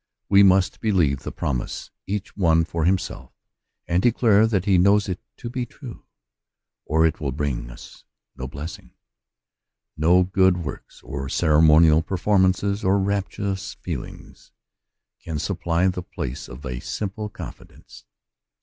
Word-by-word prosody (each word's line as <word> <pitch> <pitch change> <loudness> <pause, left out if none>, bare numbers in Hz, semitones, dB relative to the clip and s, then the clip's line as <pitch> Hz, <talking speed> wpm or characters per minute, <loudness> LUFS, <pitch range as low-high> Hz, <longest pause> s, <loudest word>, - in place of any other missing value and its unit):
We 100 0 +6
must 95 -1 +4
believe 85 - +2
the - - -7
promise, 60 - -4 0.2
each 100 +1 -4
one 85 -4 +3
for 85 -1 -2
himself, 95 +1 -1 0.6
and 85 +1 +1
declare 110 -2 +4
that 100 -4 0
he 95 -3 +4
knows 100 +2 +4
it 90 -1 -3 0.2
to 120 - -7
be 125 0 -3
true, 120 -1 -11 0.8
or 80 +2 +2
it 80 - 0
will 70 -3 -2
bring 70 -4 -3
us - - -13 0.3
no 65 0 -6
blessing. 75 +5 -9 1.0
No 85 +4 +4
good 95 0 +3
works, 65 - -9
or 70 -1 -5
ceremonial 80 0 +5
performances, 95 +2 +1
or 95 +2 +3
rapturous 100 0 -2
feelings, - - -8 0.7
can 80 -2 -5
supply 85 +4 0
the 90 -1 -1
place 65 -7 -6
of 65 +5 -10
a 65 -1 -4
simple 105 - -4
confidence. - - -12
90 Hz, 135 wpm, -23 LUFS, 80-100 Hz, 1.0 s, We